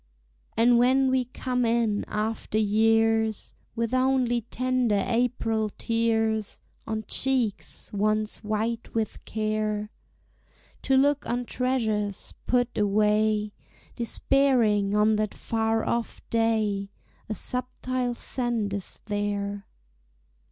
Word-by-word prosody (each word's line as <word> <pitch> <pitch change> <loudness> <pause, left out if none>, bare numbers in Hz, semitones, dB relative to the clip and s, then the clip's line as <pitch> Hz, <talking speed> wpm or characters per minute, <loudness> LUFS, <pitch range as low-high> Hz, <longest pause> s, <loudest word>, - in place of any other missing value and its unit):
And 235 +1 +5
when 260 +2 +4
we 260 -1 +2
come 250 0 -2
in 230 -3 +1
after 215 0 -2
years, 220 +1 +2 0.2
With 230 0 -1
only 255 -2 +2
tender 245 -3 0
April 230 -2 0
tears 225 -2 0 0.3
On 220 0 -2
cheeks 255 -8 -1
once 215 +1 0
white 220 +3 -2
with 220 -2 -2
care, 215 -1 -2 0.9
To 265 - +2
look 285 +1 +2
on 245 +1 -1
treasures 220 -6 -1
put 245 -1 +1
away 210 +1 +2 0.4
Despairing 235 -5 +2
on 210 +1 +4
that 215 -1 -1
far 225 0 0
off 235 -1 -3
day, 220 -3 +1 0.4
A 215 - -2
subtile 250 0 -2
scent 235 -5 -2
is 200 -2 -5
there. 205 -1 -2
225 Hz, 100 wpm, -26 LUFS, 210-245 Hz, 0.9 s, And